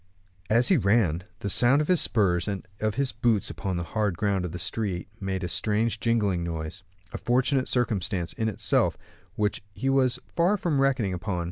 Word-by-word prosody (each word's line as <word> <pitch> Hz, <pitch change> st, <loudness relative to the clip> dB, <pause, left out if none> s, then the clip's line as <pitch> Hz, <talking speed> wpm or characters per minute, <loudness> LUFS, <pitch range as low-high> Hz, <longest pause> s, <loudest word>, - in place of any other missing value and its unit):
As 115 Hz, +3 st, +3 dB
he 185 Hz, -, +5 dB
ran, 100 Hz, -, +2 dB, 0.2 s
the 100 Hz, -, -2 dB
sound 125 Hz, +7 st, +5 dB
of 150 Hz, -, 0 dB
his 180 Hz, -2 st, +4 dB
spurs 95 Hz, -5 st, +2 dB
and 100 Hz, -3 st, -4 dB
of 110 Hz, -1 st, -1 dB
his 135 Hz, -1 st, 0 dB
boots 115 Hz, -4 st, +1 dB
upon 95 Hz, -2 st, -3 dB
the 85 Hz, -, -2 dB
hard 105 Hz, 0 st, -1 dB
ground 100 Hz, -3 st, 0 dB
of 85 Hz, -, -5 dB
the 90 Hz, -, -5 dB
street 90 Hz, +1 st, -2 dB
made 95 Hz, -2 st, -3 dB
a -, -, -1 dB
strange 110 Hz, +4 st, 0 dB
jingling 105 Hz, -7 st, +1 dB
noise; 80 Hz, +2 st, -5 dB, 0.3 s
a -, -, -4 dB
fortunate 130 Hz, +2 st, +1 dB
circumstance 100 Hz, -7 st, -1 dB
in 110 Hz, -1 st, -1 dB
itself, 105 Hz, -, +1 dB, 0.4 s
which 105 Hz, -1 st, -1 dB
he 135 Hz, -, -1 dB
was 130 Hz, -2 st, +3 dB, 0.2 s
far 180 Hz, +5 st, +3 dB
from 160 Hz, -7 st, 0 dB
reckoning 130 Hz, -8 st, +1 dB
upon. 90 Hz, 0 st, -3 dB
105 Hz, 190 wpm, -26 LUFS, 95-125 Hz, 0.4 s, he